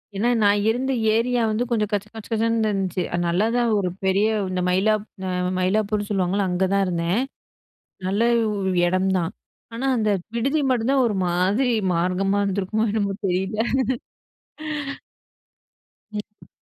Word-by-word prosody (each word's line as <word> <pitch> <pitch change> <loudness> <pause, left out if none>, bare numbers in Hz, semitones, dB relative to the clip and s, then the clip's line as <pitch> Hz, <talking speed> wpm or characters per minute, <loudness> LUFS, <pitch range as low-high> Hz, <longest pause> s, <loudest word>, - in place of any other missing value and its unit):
ஏன்னா 220 +5 +1
நான் 205 0 +4
இருந்த 255 +4 0 0.2
ஏரியா 240 +1 +1
வந்து 215 +3 0
கொஞ்சம் 215 -4 0
கச்ச 205 0 -1
கச்ச 220 - -8
கச்சன்னு 225 0 +1
இருந்துச்சு. 190 -2 -1
அது 175 - 0
நல்லாதான் 230 +7 +1
ஒரு 185 -2 0 0.2
பெரிய 195 +3 +3 0.2
இந்த 185 0 -1
மயிலாப் 205 +3 +2 0.2
அ - - -1 0.3
மயிலாப்பூர்ன்னு 205 +2 0
சொல்லுவாங்கல்ல 195 0 +1
அங்க 180 +1 +1
தான் 200 - +3
இருந்தேன். 175 +5 0 0.9
நல்ல 195 +3 0 0.3
உ - - -1 0.4
எடம் 185 +2 +1
தான். 170 +1 -2 0.4
ஆனா 260 +4 -2
அந்த 215 -1 +1 0.3
விடுதி 275 +6 +1
மட்டுந்தான் 255 +2 +2
ஒரு 210 -3 -1
மாதிரி 195 +8 +1 0.2
மார்க்கமா 185 +3 +1
இருந்திருக்குமோ 200 +3 0
என்னமோ 200 -2 0
தெரியல. 190 +4 -1 2.5
ம். 210 0 -8
205 Hz, 135 wpm, -23 LUFS, 185-225 Hz, 2.5 s, நான்